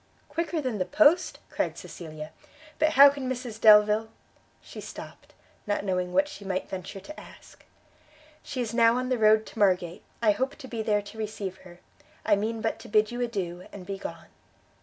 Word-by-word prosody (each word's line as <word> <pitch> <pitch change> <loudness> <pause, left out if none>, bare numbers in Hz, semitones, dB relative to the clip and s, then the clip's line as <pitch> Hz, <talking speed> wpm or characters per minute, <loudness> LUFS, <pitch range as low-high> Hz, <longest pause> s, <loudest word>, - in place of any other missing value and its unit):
"Quicker 330 +2 -2
than 250 -7 -3
the 185 - +1
post?" 315 - +3
cried - - -2
Cecilia; 155 -2 -9 0.5
"but 310 0 +3
how 280 0 +10
can 275 -2 -5
Mrs 245 -4 -5
Delvile 215 0 +6 0.3
" - - -36
she - - -10
stopt; - - -11 0.3
not 205 -1 0
knowing 180 -2 -1
what 290 +10 +3
she 295 -8 -10
might 190 -1 -3
venture 190 +1 -7
to 305 +11 -10
ask. - - -15 0.8
"She 260 -3 -4
is 230 -2 -3
now 230 0 +5
on 255 0 -2
the 255 -2 0
road 215 0 +5
to - - -10
Margate; 180 -2 +2 0.2
I 220 -2 +4
hope 260 +6 -2
to 270 - -11
be 230 -3 -4
there 210 -2 +1
to 215 +2 -11
receive 205 -3 -4
her. 180 -2 -15 0.4
I 210 - +4
mean 220 +2 -2
but 225 - -2
to - - -12
bid 215 +1 +3
you 240 +1 -4
adieu, 185 -7 -3
and 190 -3 -10
be 195 0 -5
gone." 165 -3 -8
215 Hz, 195 wpm, -27 LUFS, 190-250 Hz, 0.8 s, how